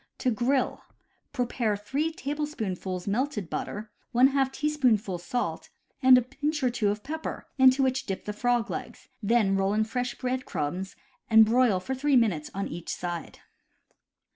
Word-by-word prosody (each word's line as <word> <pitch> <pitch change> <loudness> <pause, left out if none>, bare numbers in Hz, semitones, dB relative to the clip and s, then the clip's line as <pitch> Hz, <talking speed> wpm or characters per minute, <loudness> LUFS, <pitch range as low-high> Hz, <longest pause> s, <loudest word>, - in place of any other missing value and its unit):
To 255 - +1
grill: 250 +4 0 0.5
Prepare 245 -5 -1
3 280 +10 -1
tablespoonfuls 225 - -4
melted 210 - -1
butter, 210 +1 -4 0.3
J 270 +2 +5
teaspoonful 250 -12 +1
salt, 175 -2 -3 0.3
and 255 -1 +8
a 250 - +2
pinch 290 +3 -3
or 250 - +3
two 230 -4 +1
of 210 +1 -3
pepper, 315 +2 -5
into 260 +1 +6
which 260 0 0
dip 195 - -4
the 210 - -3
frog 240 +1 0
legs, - - -7
then 210 -2 +3
roll 195 +1 +1
in 220 - +3
fresh 245 +2 -3
bread 255 0 -2
crumbs, 180 +6 -3 0.3
and 220 -1 +8
broil 230 -3 +3
for 260 +9 -4
three 280 +2 +1
minutes 195 -11 +2
on 195 - -2
each 170 +1 -7
side. 175 -2 -5
240 Hz, 155 wpm, -27 LUFS, 200-265 Hz, 0.5 s, and